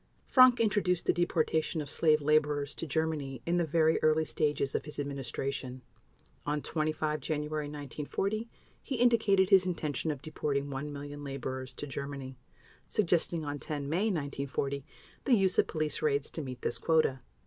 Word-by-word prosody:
Frank 255 -1 +7
introduced 205 -5 +1
the - - +3
deportation 160 -2 +1
of 150 - -4
slave 155 +1 +3
laborers 150 -1 +2
to 165 - -5
Germany 145 -4 -2
in 170 +1 +1
the 175 - +3
very 160 +1 +2
early 155 0 +3
stages 145 -2 0
of - - -1
his 150 - -7
administration. 135 -2 -4 0.6
On 150 +1 -1
25 155 0 -1
January 150 0 -2
1940 150 - -3 0.3
he 270 - -4
indicated 220 -5 +4
his 190 -1 +6
intention 155 -4 -2
of 145 -3 -3
deporting 145 -2 -2
1 140 +2 -4
million 145 0 -7
laborers 130 -2 -5
to - - -5
Germany, 140 -1 -6 0.5
suggesting 170 -4 +1
on 145 0 -4
10 145 -1 -4
May 175 +8 +1
1940 140 -6 -2 0.4
the 260 - +5
use 190 -3 +3
of - - +4
police 155 -3 -2
raids 140 -2 +1
to 160 - -4
meet 130 -3 -7
this 120 - -1
quota. 155 -3 +2
150 Hz, 160 wpm, -31 LUFS, 140-165 Hz, 0.6 s, Frank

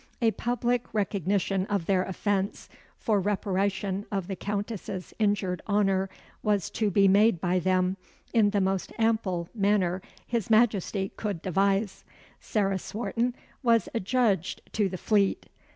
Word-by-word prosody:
A 230 -2 +3
public 245 +1 -1
recognition 195 -1 0
of 200 -5 -1
their 190 0 +2
offence, 195 +1 -2 0.3
for 215 -3 +1
reparation 195 0 -1
of 195 -3 -1
the 195 - -3
Countess's 200 -2 -4
injured 200 -4 +1
honour, 195 -2 +2 0.3
was 205 -3 0
to 215 -2 0
be 195 +1 +4
made 200 -1 +5
by 180 +1 +1
them, 185 +1 +1 0.4
in 220 -3 +5
the 205 -1 +1
most 190 0 -1
ample 215 -7 +1
manner 195 -4 +1 0.2
His 230 -4 -2
Majesty 210 -3 +2
could 205 -5 -3
devise. 195 +2 +1 0.4
Sarah 195 -3 0
Swarton 235 +4 -2 0.3
was 235 +1 +3
adjudged 220 -4 +1
to 205 -3 +1
the 185 - -5
Fleet. 200 0 +1
200 Hz, 135 wpm, -28 LUFS, 190-215 Hz, 0.4 s, made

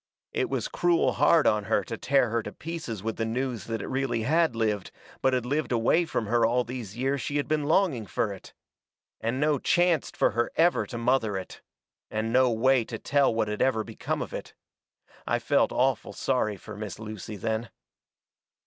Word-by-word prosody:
It - - 0
was - - -1
cruel 175 -1 +2
hard 165 -2 +4
on 105 -1 +2
her - - +1
to 115 - -5
tear 125 -1 +2
her 115 0 +1
to - - -7
pieces 155 - -6
with 110 0 -3
the 115 - -1
news 120 0 -2
that 115 -2 -3
it - - -5
really 130 -4 -1
had 160 +1 +2
lived, 105 -4 -1 0.3
but 130 - +3
had 125 -2 0
lived 145 +4 -1
away 120 +9 +3
from 120 -8 -2
her 115 +2 +2
all 120 +2 +3
these 120 -3 -7
years 135 +2 0
she 145 - -2
had 145 - -1
been 150 -1 0
longing 150 - +2
fur 105 -3 -1
it. 95 - -13 0.6
And 115 +3 -2
no 150 -1 +2
chancet 175 -2 +2
fur - - +3
her 120 0 0
ever 170 +2 +3
to 120 - -6
mother 115 -4 +1
it. 95 - -8 0.5
And 110 +1 -2
no 130 0 +5
way 125 +2 +3
to 115 0 -6
tell 140 +4 +2
what 110 -1 0
had 105 0 -3
ever 130 -4 +2
become - - -3
of - - -10
it. - - -7 0.7
I - - +2
felt - - +2
awful 125 -5 0
sorry 110 -3 0
fur 105 +3 -10
Miss 105 -3 -6
Lucy 110 -1 -7
then. 110 +3 -2
120 Hz, 200 wpm, -27 LUFS, 110-135 Hz, 0.7 s, no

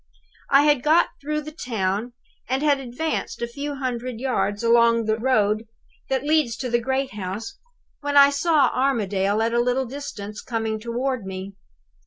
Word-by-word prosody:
"I 275 +1 +6
had 295 -3 +3
got 315 +5 +4
through 300 +1 -2
the 305 +1 -8
town, 225 - -2 0.4
and 265 +3 0
had 290 -2 +3
advanced 270 +5 -3
a - - -1
few 285 +4 -5
hundred 250 -3 -4
yards 205 -5 -1
along 230 0 +4
the 220 +1 0
road 220 -3 +1 0.4
that 265 -1 0
leads 295 -6 +2
to 250 -2 -4
the 240 - +3
great 265 +2 -1
house, 205 +2 -6 0.4
when 290 -1 0
I 280 0 +8
saw 295 0 +3
Armadale 210 -5 +1
at 230 +1 0
a 240 - +3
little 250 +2 +1
distance, 220 -6 -7
coming 225 -2 -2
toward 235 -1 -2
me. 190 +1 -6
245 Hz, 165 wpm, -23 LUFS, 220-275 Hz, 0.4 s, I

